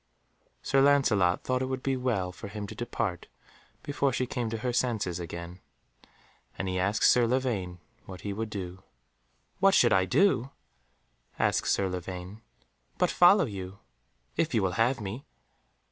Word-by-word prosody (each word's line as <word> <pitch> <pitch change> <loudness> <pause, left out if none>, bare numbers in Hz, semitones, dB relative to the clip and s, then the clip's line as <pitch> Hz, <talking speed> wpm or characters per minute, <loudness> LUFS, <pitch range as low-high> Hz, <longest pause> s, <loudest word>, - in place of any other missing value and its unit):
Sir 135 0 +3
Lancelot 120 -11 +3
thought 130 0 0
it 130 - -1
would 130 -1 -4
be 135 -1 0
well 115 -8 -1
for 95 - -9
him 105 +1 -6
to - - -8
depart 110 -6 -3 0.6
before 140 -1 0
she 130 0 -1
came 120 -2 -3
to 115 - -3
her 125 +2 -2
senses 110 -8 -1
again, 85 +1 -7 1.0
and 95 - -3
he 90 0 -1
asked 100 +4 0
Sir 120 -1 +5
Lavaine 115 -8 -1 0.3
what 95 -1 -9
he 100 - -4
would 110 +2 -4
do. 95 -3 -6 0.8
"What 195 +1 +5
should 120 - +5
I 95 -1 +3
do?" 135 - +2 0.9
asked - - +1
Sir 100 - +2
Lavaine, 90 +3 -6 0.6
"but 180 - +2
follow 180 +1 +6
you, 95 -4 -7 0.6
if 160 -6 0
you 110 - +2
will 95 - +1
have 125 +2 +2
me." 105 +6 -6
110 Hz, 160 wpm, -28 LUFS, 95-130 Hz, 1.0 s, follow